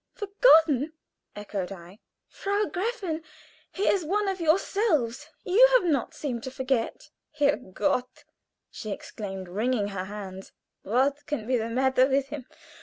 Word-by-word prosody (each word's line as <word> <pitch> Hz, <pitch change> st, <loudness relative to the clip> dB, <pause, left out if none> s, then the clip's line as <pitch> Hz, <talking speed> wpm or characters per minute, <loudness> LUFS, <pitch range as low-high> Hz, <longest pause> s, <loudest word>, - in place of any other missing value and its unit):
"Forgotten!" 325 Hz, -, +4 dB, 0.4 s
echoed 200 Hz, -3 st, -4 dB
I. 185 Hz, +2 st, -11 dB, 0.3 s
"Frau 405 Hz, +1 st, -1 dB
Gräfin, 385 Hz, -5 st, -3 dB, 0.5 s
he 390 Hz, -, -3 dB
is 385 Hz, -, +3 dB
one 405 Hz, +6 st, 0 dB
of 380 Hz, -2 st, -2 dB
yourselves. 320 Hz, -, +1 dB, 0.2 s
You 400 Hz, +7 st, +5 dB, 0.2 s
do 360 Hz, -, -1 dB
not 280 Hz, -6 st, 0 dB
seem 250 Hz, -6 st, -3 dB
to 260 Hz, -, -5 dB
forget." 260 Hz, -2 st, -2 dB, 0.3 s
"Herrgott!" 255 Hz, -1 st, 0 dB, 0.5 s
she 215 Hz, -, -7 dB
exclaimed, 195 Hz, -2 st, -6 dB
wringing 210 Hz, +3 st, 0 dB
her 190 Hz, -2 st, -4 dB
hands. 195 Hz, -2 st, -8 dB, 0.3 s
"What 275 Hz, +7 st, 0 dB
can 265 Hz, -8 st, -3 dB
be 255 Hz, +2 st, +1 dB
the 230 Hz, -1 st, -1 dB
matter 260 Hz, +2 st, +3 dB
with 275 Hz, 0 st, +1 dB
him? 285 Hz, -4 st, -7 dB
265 Hz, 135 wpm, -27 LUFS, 215-330 Hz, 0.5 s, You